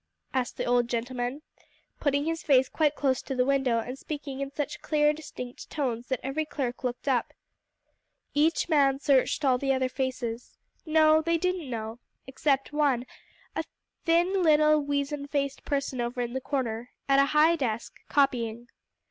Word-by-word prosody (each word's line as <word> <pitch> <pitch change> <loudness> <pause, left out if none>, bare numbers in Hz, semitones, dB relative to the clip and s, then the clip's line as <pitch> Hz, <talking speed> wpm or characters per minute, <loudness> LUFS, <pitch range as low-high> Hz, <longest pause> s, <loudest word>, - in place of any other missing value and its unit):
asked 255 -2 -1
the - - -2
old 245 -1 +2
gentleman, 245 +4 -3 0.6
putting 285 0 +1
his 325 0 -2
face 265 -4 +4
quite 300 -2 +1
close 265 -3 +1
to 270 - -5
the 250 0 +2
window, 270 -3 +2
and 250 +4 -4
speaking 285 -3 -6
in 275 0 -3
such 290 +1 -4
clear, 300 -1 +3
distinct 250 -5 -8
tones 250 -5 -2
that 260 -3 -1
every 270 +4 -1
clerk 270 -5 -4
looked 250 +2 -3
up. 255 -3 +1 1.0
Each 310 +3 +2
man 280 -4 +3
searched 280 +1 +2
all 255 -2 +3
the 270 0 +1
other 260 -1 +1
faces. 250 -3 -4 0.3
No, 310 0 +5
they 335 +1 +1
didn't 360 -4 -1
know; 225 -1 -5 0.3
except 275 +1 0
one, 280 -5 +2 0.5
a - - -1 0.4
little, 350 +3 +3 0.4
thin, - - -10
weazen 285 0 -1
faced 280 -1 -2
person 275 -3 -1
over 240 +1 -3
in 240 0 -2
the 265 - -2
corner, 245 -4 -2 0.2
at 275 0 +5
a 275 - +6
high 320 +3 +6
desk, 235 -7 -2 0.2
copying. 240 -4 +1
275 Hz, 165 wpm, -28 LUFS, 250-295 Hz, 1.0 s, a